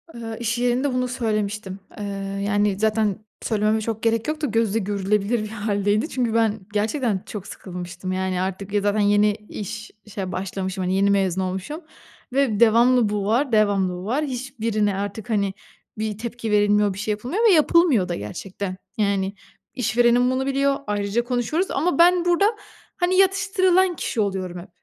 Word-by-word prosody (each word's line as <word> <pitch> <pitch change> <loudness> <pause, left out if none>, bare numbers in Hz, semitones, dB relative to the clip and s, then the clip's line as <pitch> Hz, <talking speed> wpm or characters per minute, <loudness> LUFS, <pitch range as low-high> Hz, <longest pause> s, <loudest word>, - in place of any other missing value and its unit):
Eee, 225 -1 -6
iş 230 0 -1
yerinde 245 +3 +1
bunu 250 0 0
söylemiştim. 215 -5 -2 0.2
Eee, 205 - -4 0.4
yani, 205 -1 +1
zaten 215 -1 0 0.2
söylememe 215 0 +1
çok 220 0 -4
gerek 230 -1 +1
yok 310 0 -2
da, 295 - +1
gözle 225 -2 +1
görülebilir 205 +2 0
bir 215 - -6
hâldeydi. 205 +3 0
Çünkü 240 -4 -1
ben 220 -2 +2
gerçekten 215 -1 0
çok 200 -3 -7
sıkılmıştım. 180 0 -7
Yani, 185 -1 -1
artık, 195 +2 -4
ya, 205 - +2
zaten 205 +1 +1
yeni 205 0 +4
iş 210 0 -7
işe 195 -3 -5
başlamışım, 190 0 -3
hani, 185 +1 0
yeni 200 +1 +3
mezun 190 -2 +1
olmuşum 190 - -4 0.5
ve 260 -6 +2
devamlı 235 0 +5
bu 205 -1 -2
var, 245 +6 +1
devamlı 200 -4 +2
bu 180 +2 -7
var. 275 +8 0
Hiçbirine 230 -6 -1
artık, 205 +3 -5
hani, 200 -3 +1 0.4
bir 215 -1 -3
tepki 230 -1 -5
verilmiyor, 205 -1 +3
bir 195 - -8
şey 210 0 -1
yapılmıyor 250 - -2
ve - - +6
yapılmıyor 305 - +4
da 175 - -1
gerçekten. 185 - -6 0.2
Yani, 200 -2 0 0.4
işverenim 245 +1 +3
bunu 260 +1 -1
biliyor, 275 +1 +1
ayrıca 205 +3 0
konuşuyoruz 250 +9 -1
ama 335 +5 0
ben 350 0 +5
burada, 350 +3 +3 0.5
hani, 360 +1 +1
yatıştırılan 375 -2 +3
kişi 235 - -2
oluyorum 190 -3 -2
hep. 175 - -11
215 Hz, 165 wpm, -23 LUFS, 200-245 Hz, 0.5 s, ve